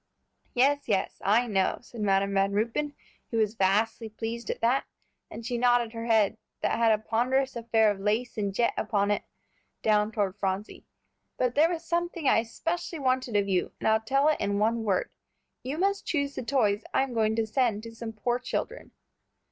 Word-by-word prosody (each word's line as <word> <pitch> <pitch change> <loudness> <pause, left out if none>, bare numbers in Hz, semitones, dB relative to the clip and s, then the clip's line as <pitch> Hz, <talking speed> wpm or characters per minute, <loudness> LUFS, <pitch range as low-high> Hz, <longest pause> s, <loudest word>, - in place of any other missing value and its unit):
"Yes, 280 +3 +3
yes, 200 -4 -1
I 220 +5 +3
know," 195 -5 +1
said 235 -2 -9
Madam 200 -1 +2
Van 195 0 +2
Ruypen, 235 +8 -1 0.3
who 230 - -2
was 215 -1 +2
vastly 220 +3 +1
pleased 225 +1 -5
at - - -2
that, 245 +4 +2 0.4
and 230 - -8
she 240 -1 -2
nodded 245 -2 +3
her 230 0 -5
head, 220 -2 +3 0.2
that - - 0
had 230 -1 +4
a 215 - +4
ponderous 250 +5 0
affair 225 -2 +3
of 200 - -5
lace 215 +5 -1
and 205 -3 -1
jet 235 +4 +1
upon 205 -2 0
it, 205 - -1 0.6
down 210 0 +3
toward 200 -4 -1
Phronsie; 195 +1 -3 0.5
"but 250 -1 +1
there 310 +5 +4
was 335 -1 -4
something 340 -2 -1
I - - +5
especially 330 +9 -3
wanted 255 -4 0
of 200 -1 +2
you, 185 -2 0
and - - -1
I'll 220 0 +4
tell 275 +6 +2
it 310 - +1
in 200 0 0
one 225 +2 +1
word. 195 -4 0 0.5
You 270 +4 -4
must 395 +2 0
choose 280 -3 0
the - - -4
toys 225 -5 +1
I'm 265 -2 +1
going 220 -1 +1
to 225 0 +1
send 220 -2 0
to 230 0 -9
some 225 0 -6
poor 240 +3 -1
children." - - -4
230 Hz, 190 wpm, -28 LUFS, 210-255 Hz, 0.6 s, I